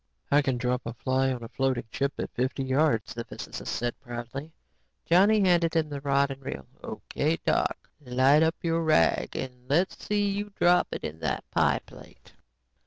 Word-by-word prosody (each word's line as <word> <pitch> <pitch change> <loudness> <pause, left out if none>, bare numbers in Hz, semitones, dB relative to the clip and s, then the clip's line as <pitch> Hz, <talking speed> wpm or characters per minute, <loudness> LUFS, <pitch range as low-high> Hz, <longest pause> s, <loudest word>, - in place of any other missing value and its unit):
"I 145 +1 +6
can 135 -3 0
drop 125 0 0
a 115 - -5
fly 130 +2 +1
on 125 -2 -4
a - - -6
floating 130 0 0
chip 140 0 -1
at - - -4
fifty 130 +2 -1
yards," 130 -4 +1
the 115 - -4
physicist - - -7
said 120 0 -2
proudly. 125 +4 -7 0.5
Johnny 200 +5 +5
handed 175 -3 +3
him 160 -2 +1
the 145 -1 -5
rod 140 0 +2
and 135 0 -7
reel. 65 - -6 0.2
"O.K., 155 +3 -2
Doc, - - 0 0.2
light 130 +4 +4
up 160 +1 +3
your 165 0 +1
rag 155 - +2
and 130 - -3 0.2
then 145 - +4
let's 185 +2 -1
see 205 -1 +1
you 205 +1 -3
drop 175 0 +4
it - - -5
in 80 +1 -5
that - - -2
pie - - +2
plate." - - -16
140 Hz, 185 wpm, -27 LUFS, 125-165 Hz, 0.5 s, I